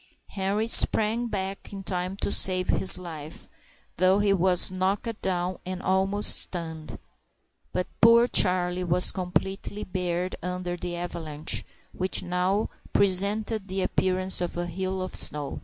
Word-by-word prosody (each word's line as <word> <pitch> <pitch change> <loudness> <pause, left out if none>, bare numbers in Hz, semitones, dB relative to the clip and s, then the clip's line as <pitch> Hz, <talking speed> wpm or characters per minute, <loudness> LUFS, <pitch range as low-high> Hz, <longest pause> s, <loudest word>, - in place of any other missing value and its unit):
Henri 200 +3 -2
sprang 230 +1 +2
back 195 -2 -5
in 195 -1 -8
time 185 0 -3
to 200 - -3
save 185 -1 +3
his 190 - +4
life, 160 -4 -9 0.5
though 185 +2 +3
he 205 -1 +2
was 185 -1 +3
knocked 195 +4 -2
down 180 -1 -2
and 185 0 -5
almost 195 +2 +2
stunned; 160 - -5 0.7
but 180 - -2 0.2
poor 230 +1 +7
Charlie 180 -3 +3
was 180 +1 +1
completely 190 +2 -3
buried 180 0 -3
under 180 0 -4
the 175 0 -5
avalanche, 165 -3 -4 0.3
which 185 +1 +1
now 180 +3 0 0.2
presented 200 +2 +3
the 190 0 -2
appearance 185 0 +1
of 175 -1 -4
a 175 - -2
hill 185 +2 -4
of 185 - -7
snow. 145 -1 -1
185 Hz, 140 wpm, -26 LUFS, 180-195 Hz, 0.7 s, poor